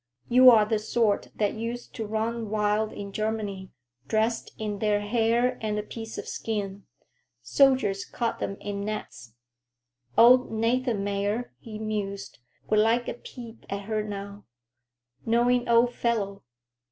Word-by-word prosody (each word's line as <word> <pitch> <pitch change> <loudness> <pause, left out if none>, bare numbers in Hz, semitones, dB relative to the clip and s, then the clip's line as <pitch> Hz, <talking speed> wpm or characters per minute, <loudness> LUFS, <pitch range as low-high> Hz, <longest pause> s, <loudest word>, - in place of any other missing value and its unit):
"You 255 +1 +8
are 220 -3 +6
the 215 0 0
sort 215 -1 +1
that 205 -2 0
used 235 +2 -5
to 220 -2 -4
run 220 +1 -2
wild 210 0 +1
in 200 -1 -7
Germany, 205 -3 -3 0.4
dressed 220 +4 0
in 210 -2 -4
their 210 -1 +1
hair 230 +3 +1
and 215 -1 -1
a 210 - -2
piece 225 +1 -8
of - - -6
skin. 200 -3 -4 0.6
Soldiers 260 -8 +3
caught 235 -1 -3
'em 195 - -2
in 200 -1 -4
nets. 200 - -6 0.8
Old 250 +2 +7
Nathanmeyer," 225 -2 0
he 215 -2 -8
mused, 205 -6 -4 0.3
"would 215 - +3
like 230 +3 +2
a - - -2
peep 235 -1 -11
at 200 +1 -4
her 215 +1 -1
now. 200 -1 -7 0.8
Knowing 240 +1 +2
old 235 +1 +4
fellow. 205 -5 -1
220 Hz, 140 wpm, -27 LUFS, 205-235 Hz, 0.8 s, You